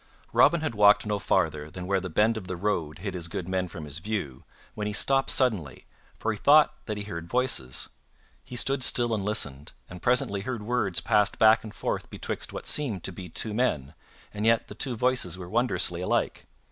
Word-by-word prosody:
Robin 170 -2 +5
had 155 -6 -2
walked 105 0 +5
no 105 -1 -1
farther 80 -7 0
than 90 +3 -7
where 95 +1 +1
the 95 0 -6
bend 110 +7 +2
of 95 -4 -6
the 90 - -4
road 85 -6 -2
hid 95 +2 -5
his 85 -2 -2
good 85 +1 -5
men 95 -1 -1
from 80 -2 -8
his 75 +1 -6
view, 85 -10 -4 0.3
when 105 -1 -4
he 105 - -3
stopped 135 +5 +2
suddenly, 100 - 0 0.3
for 115 - -1
he 105 - -5
thought 150 +1 +6
that 105 -2 -3
he 105 - -3
heard 85 -5 -7
voices. 120 - 0 0.5
He 125 - -10
stood 135 +2 +1
still 120 -1 +3
and 105 -3 -1
listened, 75 -10 -1
and 90 0 -11
presently 120 -5 +2
heard 115 0 -4
words 105 -6 0
passed 105 0 +2
back 110 +1 +5
and 110 - -8
forth - - -3
betwixt - - -4
what - - -7
seemed 120 - -1
to - - -3
be 90 0 -9
two 105 +6 +2
men, 80 - -1 0.4
and 105 0 -4
yet 115 0 +2
the - - -7
two 125 +3 -2
voices 125 -7 0
were 90 -2 -8
wondrously 90 -5 0
alike. 90 - -1
105 Hz, 210 wpm, -27 LUFS, 90-115 Hz, 0.5 s, thought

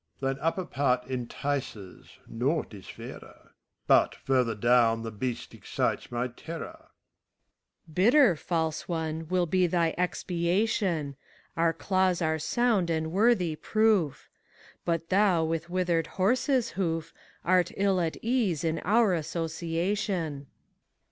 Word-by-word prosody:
MEPHISTOPHELES. 135 0 -1
Thine 160 - -1
upper 180 +2 -1
part 130 -5 0
entices; 125 -5 -4 0.2
naught 135 +4 -1
is 95 -3 -11
fairer; - - -11 0.3
But, - - +4
further 125 -4 0
down, 115 0 +3
the 115 - -5
beast 120 +3 -4
excites - - -2
my 120 +1 -1
terror. 315 - -8 1.0
SPHINX. 160 - -16
Bitter, 230 - +5
False 160 0 -2
one, 160 -1 -3
will 180 +1 +1
be 180 +2 +2
thy 170 -1 +1
expiation; 175 - 0 0.4
Our 165 0 +3
claws 185 +1 +1
are 160 -2 0
sound 215 +1 +1
and 160 -1 -1
worthy 190 -4 +2
proof. 215 -5 +1 0.6
But 165 -1 -1
thou 190 -4 +3
with 165 +1 -2
withered 175 -3 0
horseVhoof, 195 - 0 0.3
Art 180 -1 +3
ill 195 -2 +2
at 165 -2 -2
ease 225 - +1
in 165 0 0
our 215 0 +3
association. 165 -1 -2
165 Hz, 120 wpm, -28 LUFS, 150-185 Hz, 1.0 s, Bitter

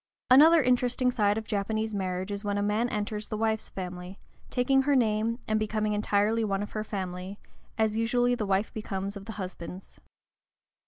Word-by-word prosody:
Another 310 +4 +8
interesting 250 0 +2
side 210 -3 +2
of 220 - -4
Japanese 215 +2 -2
marriage 185 0 -2
is 200 +1 -4
when 205 -1 -1
a 205 - 0
man 215 +4 +1
enters 210 0 -3
the 215 - -4
wife's 220 0 -1
family, 180 0 -7 0.3
taking 270 +2 +3
her 280 +1 +2
name 225 -1 +1
and 215 -1 +1
becoming 215 0 -1
entirely 210 +2 +1
one 200 -1 -1
of 205 - -7
her 215 - -3
family, 190 -1 -5 0.4
as 220 -1 +1
usually 245 +2 +2
the 220 -4 -2
wife 195 +2 0
becomes 200 -2 -4
of 200 -1 -8
the 225 - -6
husband's. 185 -1 -8
215 Hz, 175 wpm, -28 LUFS, 200-225 Hz, 0.4 s, Another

